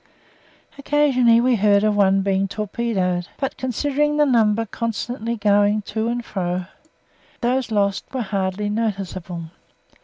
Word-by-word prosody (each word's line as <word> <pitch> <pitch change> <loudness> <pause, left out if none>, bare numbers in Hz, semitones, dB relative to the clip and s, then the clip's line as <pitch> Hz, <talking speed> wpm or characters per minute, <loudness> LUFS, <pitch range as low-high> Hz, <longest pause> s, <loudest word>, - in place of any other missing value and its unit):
Occasionally 270 -5 +3
we 250 -1 +2
heard 205 0 +3
of 215 -1 +2
one 195 -1 +3
being 195 0 +1
torpedoed, 200 -3 -2
but 270 - -3
considering 290 +4 -1
the 300 - +4
number 225 -4 +2
constantly 230 +1 -3
going 205 0 +2
to 220 +2 -3
and 240 0 -2
fro 180 -2 -3 0.8
those 255 +1 0
lost 200 -2 0
were 260 -3 -2
hardly 195 0 -2
noticeable. 190 -6 -4
215 Hz, 125 wpm, -21 LUFS, 195-240 Hz, 0.8 s, the